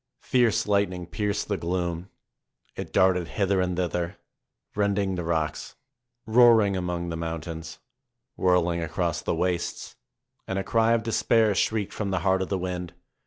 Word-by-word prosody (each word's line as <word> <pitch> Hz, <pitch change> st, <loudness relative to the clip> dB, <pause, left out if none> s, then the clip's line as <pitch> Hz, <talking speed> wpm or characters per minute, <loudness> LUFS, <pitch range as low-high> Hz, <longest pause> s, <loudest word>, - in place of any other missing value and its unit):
Fierce 120 Hz, -4 st, +2 dB
lightning 100 Hz, -3 st, 0 dB
pierced 105 Hz, +3 st, -2 dB
the 100 Hz, -, -1 dB
gloom; 85 Hz, +1 st, -3 dB, 0.7 s
it -, -, -6 dB
darted 90 Hz, -2 st, +3 dB
hither 100 Hz, 0 st, +1 dB
and 90 Hz, -1 st, -1 dB
thither, 90 Hz, +1 st, -2 dB, 0.6 s
rending 100 Hz, -1 st, 0 dB
the 90 Hz, -1 st, -3 dB
rocks, 80 Hz, -2 st, -2 dB, 0.5 s
roaring 110 Hz, -3 st, +5 dB
among 90 Hz, -1 st, -2 dB
the 85 Hz, -, -3 dB
mountains, 80 Hz, 0 st, -5 dB, 0.6 s
whirl 90 Hz, -2 st, +3 dB
ing 85 Hz, 0 st, -2 dB
across 85 Hz, -1 st, -2 dB
the -, -, -1 dB
wastes. 90 Hz, -1 st, -2 dB, 0.5 s
And 95 Hz, -, -2 dB
a 95 Hz, -, -1 dB
cry 115 Hz, +2 st, +2 dB
of 115 Hz, -1 st, +1 dB
despair 115 Hz, -1 st, +2 dB
shrieked 105 Hz, +1 st, 0 dB
from 105 Hz, -2 st, -3 dB
the 95 Hz, -2 st, -1 dB
heart 95 Hz, 0 st, +2 dB
of 95 Hz, -, -3 dB
the 95 Hz, -, 0 dB
wind. 90 Hz, -1 st, -4 dB
95 Hz, 155 wpm, -26 LUFS, 85-100 Hz, 0.7 s, roaring